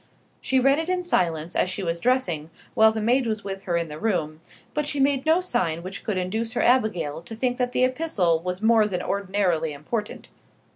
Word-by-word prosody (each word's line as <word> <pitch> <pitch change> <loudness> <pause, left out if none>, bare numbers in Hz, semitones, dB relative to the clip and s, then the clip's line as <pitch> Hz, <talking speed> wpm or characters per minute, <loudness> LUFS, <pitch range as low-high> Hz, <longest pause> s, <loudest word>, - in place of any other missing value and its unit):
She 265 - +2
read 275 +3 +4
it 325 +2 -3
in 365 -1 0
silence 170 - 0
as - - +2
she 190 +1 -3
was 170 -1 -2
dressing, 175 - 0 0.2
while 220 0 +6
the 220 - -3
maid 240 +3 +2
was 215 -2 -2
with 195 0 -6
her 175 -2 0
in 170 -1 -1
the 150 0 -8
room; 160 -8 -1 0.3
but 300 -1 -1
she 290 - -2
made 275 +1 +2
no 325 +3 +4
sign 170 - -1
which 185 +2 -7
could 210 -4 -2
induce 220 +6 -2
her - - 0
Abigail 215 - +1
to 225 +6 -9
think 245 +2 -1
that 250 -1 0
the 250 - +1
epistle 255 - +1
was 180 +4 -5
more 220 -1 +5
than 185 -4 -3
ordinarily 185 -5 0
important. 210 +10 -5
210 Hz, 210 wpm, -24 LUFS, 170-250 Hz, 0.3 s, while